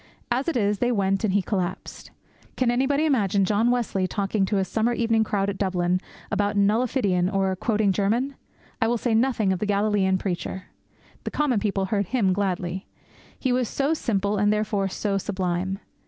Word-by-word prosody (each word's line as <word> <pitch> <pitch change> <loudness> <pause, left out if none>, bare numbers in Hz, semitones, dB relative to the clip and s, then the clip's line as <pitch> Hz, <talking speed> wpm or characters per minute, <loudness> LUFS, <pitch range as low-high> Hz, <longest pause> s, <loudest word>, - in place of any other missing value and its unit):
As 255 +5 0
it 335 - 0
is, 205 -2 +1
they 245 0 +2
went 195 -2 +1
and 215 - +2
he 200 0 +2
collapsed. 190 -2 -4 0.5
Can 250 -2 +2
anybody 275 +5 +1
imagine 205 - +2
John 215 +4 +2
Wesley 230 -6 0
talking 195 0 -1
to 210 - -1
his 190 -1 +1
summer 225 +4 +1
evening 225 -1 +2
crowd 200 -2 -1
at 200 -1 -3
Dublin 185 -2 0 0.3
about 205 0 0
'nullifidian,' 200 -3 +2
or 195 -1 +1
quoting 210 0 +1
German? 225 +8 0 0.5
I 225 - +3
will 240 +1 +1
say 235 0 -1
nothing 225 -4 +2
of 185 - -3
the 210 - -2
Galilean 200 -2 +2
preacher. 185 0 -4 0.6
The - - -3
common 280 -7 +1
people 195 -2 -1
heard 200 0 -1
Him 205 -6 +2
gladly. 185 -1 -2 0.5
He 260 - -1
was 250 -1 +1
so 280 +3 0
simple 205 -8 -1
and 205 +1 +3
therefore 210 -2 0
so 195 +1 -1
sublime. 185 -1 -2
205 Hz, 180 wpm, -25 LUFS, 190-230 Hz, 0.6 s, I